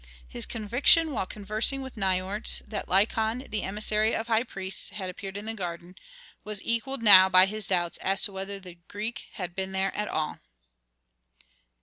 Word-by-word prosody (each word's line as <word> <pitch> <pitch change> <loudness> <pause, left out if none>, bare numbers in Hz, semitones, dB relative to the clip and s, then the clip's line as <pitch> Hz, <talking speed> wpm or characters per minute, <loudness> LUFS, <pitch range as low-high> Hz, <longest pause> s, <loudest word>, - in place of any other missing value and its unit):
His - - -3
conviction 250 +9 +3
while 210 -8 -3
conversing 215 +6 0
with 265 - -9
Nikotris, 190 +1 +1
that 215 - -5
Lykon, 220 +6 +1
the 215 -1 -2
emissary 215 +2 +1
of 225 - -3
high 225 0 +3
priests, 190 -5 -5
had 190 -3 -5
appeared 195 +2 -8
in 205 - -5
the 225 - -1
garden, 175 -3 -6 0.5
was 210 -1 -2
equalled 230 +2 -2
now 190 -3 +8
by 185 0 +7
his 215 +1 -2
doubts 175 -2 0
as 195 +1 0
to 205 - +1
whether 195 +1 -5
the 180 -2 -12
Greek 215 +3 -5
had 180 -4 -6
been 190 0 -3
there 190 0 -1
at 210 0 -3
all. 155 -1 -3
205 Hz, 170 wpm, -26 LUFS, 190-220 Hz, 0.5 s, now